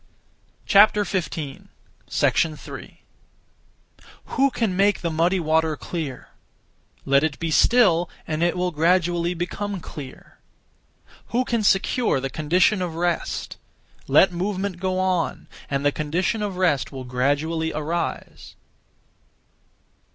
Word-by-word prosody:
3. 195 -8 +2 2.6
Who 275 +1 +2
can 225 -7 -1
(make) 200 +1 +2
the 170 - -2
muddy 170 +4 +1
water 160 -1 +1
(clear)? 150 -8 -6 0.8
Let 140 +1 +3
it 155 -3 -1
be 165 -1 -3
still, 175 -4 +4 0.2
and 155 0 -3
it 175 +1 +1
will 180 0 0
gradually 175 +2 +1
become 195 +3 -4
clear. 145 -5 -11 0.9
Who 250 +2 0
can 235 -2 0
secure 205 - +2
the 135 0 -4
condition 180 +6 +2
of 175 -3 -3
rest? 175 +1 -2 0.5
Let 190 - +5
movement 190 +1 -3
go 185 0 -1
on, 185 -3 -1 0.2
and 140 0 -1
the 145 - +4
condition 170 +9 -1
of 200 -3 -3
rest 170 -7 +1
will 130 -1 -7
gradually 145 +6 -1
arise. 165 +3 -4
175 Hz, 110 wpm, -23 LUFS, 155-190 Hz, 2.6 s, Let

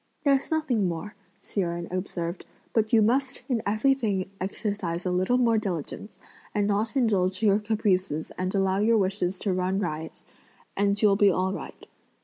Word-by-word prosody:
"There's 275 -2 +2
nothing 275 - +1
more," 175 +5 -4 0.3
Hsi 200 - -2
Jen 170 -1 -3
observed; 180 -1 -4 0.3
"but 220 -1 +1
you 220 -2 +5
must 255 +4 +1
in 245 -5 0
everything 215 -4 +1
exercise 190 -3 -3
a 180 - 0
little 185 +7 +2
more 230 -3 +3
diligence, 190 +1 -5 0.4
and 205 -1 +2
not 210 +4 0
indulge 200 -6 +1
your 205 -1 +4
caprices 195 -7 0
and 185 +2 -2
allow 195 0 +2
your 225 +2 +4
wishes 190 -2 0
to 195 0 -1
run 185 +1 0
riot, 160 -4 -4 0.5
and 200 +1 +1
you'll 205 -2 +4
be 205 -1 +6
all 185 +1 0
right. - - -8
200 Hz, 160 wpm, -26 LUFS, 185-220 Hz, 0.5 s, be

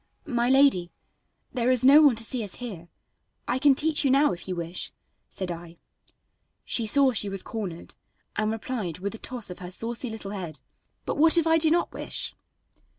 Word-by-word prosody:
"My 240 -1 0
lady, 265 -11 +4 0.6
there 245 -1 0
is 255 -1 +5
no 285 +3 +8
one 285 -6 +5
to 225 - 0
see 240 0 -2
us 200 - -5
here; 190 -9 -8 0.6
I 250 - 0
can 280 0 +5
teach 310 +2 +2
you 275 - +2
now, 280 +3 +4
if 170 +1 -9
you 185 - -3
wish," 170 +1 -4 0.4
said 185 -2 -5
I. 170 0 -9 0.9
She 230 -2 0
saw 275 +3 +5
she 210 -3 +2
was 195 -1 -4
cornered, 190 -7 -6 0.4
and 215 0 0
replied, 220 -6 -4
with 200 +3 -4
a 225 - -9
toss 245 -7 -5
of 180 - -9
her 180 -1 -7
saucy 230 +6 -2
little 215 -3 -7
head: 175 -7 -6 0.5
"But - - -3
what 325 +2 +7
if 335 - +3
I 325 0 +4
do 315 0 +4
not 345 +2 +1
wish?" - - -3
230 Hz, 195 wpm, -26 LUFS, 185-270 Hz, 0.9 s, no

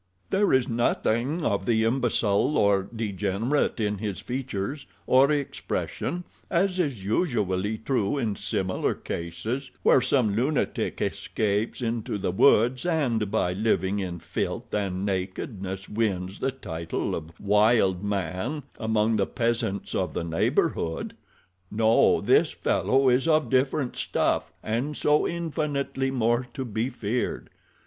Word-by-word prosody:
There 200 +1 +3
is 130 -1 +3
nothing 120 +5 0
of 100 -1 0
the 110 -1 +3
imbecile 115 0 +1
or 100 -2 +3
degenerate 105 +6 0
in 105 -2 -1
his 105 -3 -3
features 130 +1 -4 0.2
or 135 +3 +5
expression, 150 +4 -2 0.3
as 185 +1 +1
is 135 - -1
usually 105 - 0
true 110 0 0
in 110 -6 -1
similar 95 -1 -1
cases, 95 +11 -4
where 130 - +5
some 125 -5 +2
lunatic 135 +6 0
escapes 105 +3 -1
into 115 -2 -2
the 95 - -1
woods 120 +4 +4
and 130 - 0
by 90 -2 +1
living 100 -1 +1
in 90 -3 -3
filth - - -4
and 95 -2 -1
nakedness 95 0 -4
wins 100 -3 -2
the - - 0
title 85 -11 -4
of 80 +1 -6
wild 105 -2 +3
man 100 - -2 0.2
among 110 0 +1
the 95 - +1
peasants 115 -5 -1
of - - -1
the - - -1
neighborhood. 80 0 0 0.5
No, 110 +1 +4
this - - +3
fellow 135 +1 +2
is 130 +4 +3
of 155 -3 +2
different 130 0 +1
stuff—and 125 +7 -1
so 150 0 +3
infinitely 150 -5 -2
more 120 -1 +1
to 130 - -3
be 115 +2 -2
feared. 120 -1 -3
110 Hz, 125 wpm, -26 LUFS, 100-135 Hz, 0.5 s, or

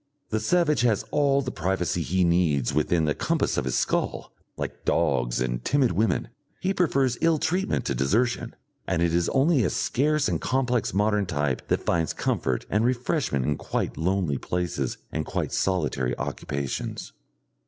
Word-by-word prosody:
The 110 - 0
savage 150 +2 +2
has 115 -4 +2
all 140 -1 +2
the 125 - -3
privacy 90 - -1
he 95 +3 +1
needs 85 -7 +2
within 80 +2 +2
the 75 - +1
compass - - 0
of - - -1
his - - 0
skull; - - -1 0.2
like - - -5
dogs - - +1
and - - -2
timid 135 - +2
women, 110 +6 0 0.3
he 190 +1 0
prefers 135 -9 +1
ill 165 -1 +4
treatment 185 +6 0
to - - 0
desertion, 110 - 0 0.3
and 85 - +1
it 85 -1 +1
is 85 0 +2
only 140 -1 +3
a 90 - +2
scarce 150 - +1
and - - -1
complex 125 -3 0
modern 105 0 +1
type 75 -6 -1
that - - 0
finds 80 -1 +1
comfort 65 -2 -1
and 105 +3 +1
refreshment 125 - 0
in 75 -1 0
quite - - -3
lonely 85 -4 0
places 85 -7 -2
and 80 - -2
quite - - -3
solitary 75 -9 0
occupations. 70 -1 -4
95 Hz, 165 wpm, -26 LUFS, -, 0.3 s, ill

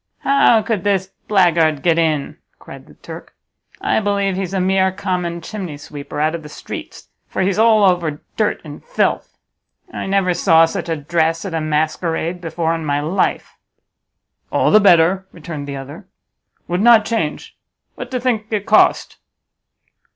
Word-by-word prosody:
"How 255 -5 +4
could 205 -4 -2
this 195 -2 0 0.2
blackguard 170 -7 +2
get 170 -1 +3
in?" 155 -4 -1 0.2
cried - - -13
the - - -17
Turk, - - -11 0.4
"I - - +1
believe 200 -2 0
he's 190 -1 -3
a - - +1
mere 190 +1 +2
common 180 -3 -3
chimneysweeper 150 -7 -7
out 155 +2 +1
of 170 - -5
the 150 - -11
streets, - - -9 0.2
for - - -2
he's 195 +2 0
all 220 -2 +5
over 175 -6 +1 0.2
dirt 215 -2 0
and 150 -2 -10
filth. - - -1 0.6
I - - -5
never 195 -2 +1
saw 165 -2 +4
such 165 - -5
a 165 - 0
dress 165 +3 -1
at 190 - -5
a 160 - -1
masquerade 160 +3 -1
before 165 -1 -2
in 165 -1 -4
my 145 -1 0
life." 160 +6 -2 0.9
"All - - +2
the 215 - +7
better," 190 0 +4
returned 155 -3 -8
the 140 - -5
other; 145 +8 -10 0.6
"would 175 +2 -1
not 230 -1 +6
change. 165 -10 -3 0.4
What 250 - -8
do 255 -1 -2
think 235 -4 -1
it 210 -2 -2
cost?" - - +3
175 Hz, 160 wpm, -18 LUFS, 160-200 Hz, 0.9 s, the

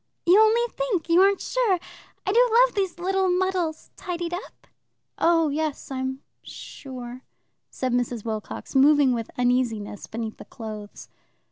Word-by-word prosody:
"You 360 +4 +6
only 440 +2 +5
think? 415 -10 -2
You 340 +2 +6
aren't 395 +1 +4
sure? 470 -7 +1 0.5
I 385 - +1
do 485 +4 +5
love - - +5
these 385 -4 -1
little 380 +1 +1
muddles 360 -3 -1
tidied 350 -1 -4
up?" 360 - -8 0.5
"Oh 330 -2 +3
yes, 300 -1 -3
I'm 260 0 -3 0.2
sure," 255 -2 -9 0.5
said 255 -2 -3
Mrs. 245 -2 -1
Wilcox, 220 +4 -5
moving 280 -1 +5
with 230 -2 -3
uneasiness 245 -5 0
beneath 225 -1 -5
the - - -11
clothes. 215 -2 -9
315 Hz, 140 wpm, -25 LUFS, 245-375 Hz, 0.5 s, You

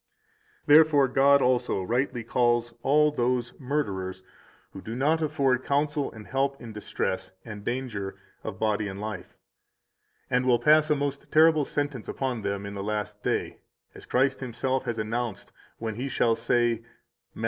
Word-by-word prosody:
191 145 -1 +8
Therefore 150 -4 +4
God 140 +1 +5
also 125 -6 +1
rightly 120 +3 -1
calls 120 0 +1
all 150 +3 +4
those 125 -3 -1
murderers 95 -10 -3 0.5
who 95 - -8
do 115 +4 -6
not 155 +5 +2
afford 140 -5 +1
counsel 145 0 0
and 110 -2 -11
help 135 +2 -1
in 115 -2 -9
distress 95 -3 -3
and 105 -3 -8
danger 115 -5 -3 0.3
of - - -5
body 105 -1 0
and 95 0 -6
life, 105 -3 -6 0.9
and 125 +1 +1
will 120 -1 +5
pass 155 +3 +4
a 150 - +4
most 140 -1 -3
terrible 155 -1 +5
sentence 145 -5 -3
upon 130 -4 -2
them 100 0 -3
in 100 - -6
the 100 - -5
last 105 0 -3
day, - - -2 0.3
as - - -12
Christ 135 +1 +2
Himself 130 +1 -2
has 115 - -2
announced 115 0 -3 0.3
when 110 -1 -4
He 125 +6 -4
shall 115 -2 +2
say, 115 0 +1 0.5
Matt. - - -11
125 Hz, 160 wpm, -27 LUFS, 110-140 Hz, 0.9 s, 191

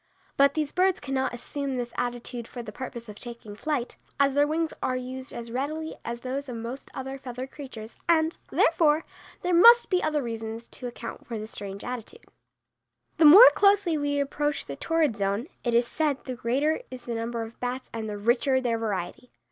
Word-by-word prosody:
But 280 0 +4
these 305 -2 -1
birds 370 0 +2
cannot 265 -1 -1
assume 275 +3 -4
this 240 -1 -4
attitude 245 -1 -3
for 240 - -7
the 210 - -7
purpose 235 0 -7
of 210 -1 -10
taking 235 -4 -8
flight, 275 0 -2 0.2
as 280 -1 +4
their 290 +1 +4
wings 320 +1 -1
are 255 - 0
used 260 +1 -6
as 235 -1 -7
readily 310 +6 -3
as 235 0 -5
those 265 +2 -4
of 245 - -5
most 235 +4 -6
other 265 +1 -5
feathered 255 0 -7
creatures, 240 -6 -9
and, 320 -1 +3
therefore, 320 -1 +3 0.4
there 360 0 +1
must 470 +8 +8
be 365 -1 +3
other 300 -2 0
reasons 225 0 -5
to 250 - -7
account 240 - -8
for 230 - -4
the 215 - -5
strange 200 -2 -7
attitude. 250 - -7 0.9
The 325 - +5
more 390 +12 +11
closely 400 -4 +4
we 290 -1 0
approach 290 +1 -1
the 140 - -6
torrid 315 - +1
zone, 200 +4 0 0.2
it 240 -1 +1
is 235 +1 +4
said, 290 +1 -1
the 255 - -4
greater 265 - 0
is 255 -1 -9
the 240 - -3
number 230 0 -3
of 225 +1 -10
bats 250 +1 -4
and 220 -1 -4
the 205 - -4
richer 240 +5 +2
their 235 -3 0
variety. 210 +2 -4
255 Hz, 195 wpm, -27 LUFS, 235-295 Hz, 0.9 s, more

